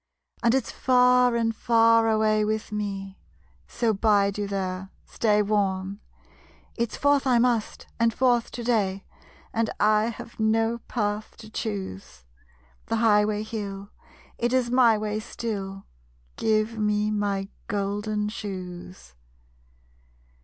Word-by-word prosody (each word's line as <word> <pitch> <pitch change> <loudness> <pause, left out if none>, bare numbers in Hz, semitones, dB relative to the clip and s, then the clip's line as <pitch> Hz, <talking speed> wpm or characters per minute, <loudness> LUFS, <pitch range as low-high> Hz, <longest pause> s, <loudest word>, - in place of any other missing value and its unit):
And 235 +1 +3
it's 265 -3 -1
far 250 -1 +4
and 225 -1 0
far 230 0 +4
away 215 -1 +2
with 215 +1 -2
me; 195 -2 -4 0.5
So 230 -2 0
bide 200 -1 +2
you 205 - -1
there, 190 -1 -3 0.2
stay 210 -2 +1
warm. 200 -1 -1 0.8
It's 235 -2 -2
forth 285 -1 +2
I 250 -2 +4
must, 235 -2 0
and 230 0 +3
forth 240 -1 +2
to 240 - -5
day; 200 -5 0 0.5
And 225 0 0
I 215 +1 +4
have 235 0 -7
no 225 +1 +1
path 210 -2 -3
to 215 -1 -12
choose. 95 - -5 0.6
The 225 - 0
highway 210 -2 +3
hill, 200 -2 -6 0.5
it 240 +1 0
is 250 -2 +1
my 245 -3 +5
way 210 0 -2
still. 195 -4 -5 0.5
Give 220 +1 0
me 210 0 +1
my 200 -2 -1 0.2
golden 205 +1 -2
shoes. 185 - -8
215 Hz, 125 wpm, -25 LUFS, 200-230 Hz, 0.8 s, my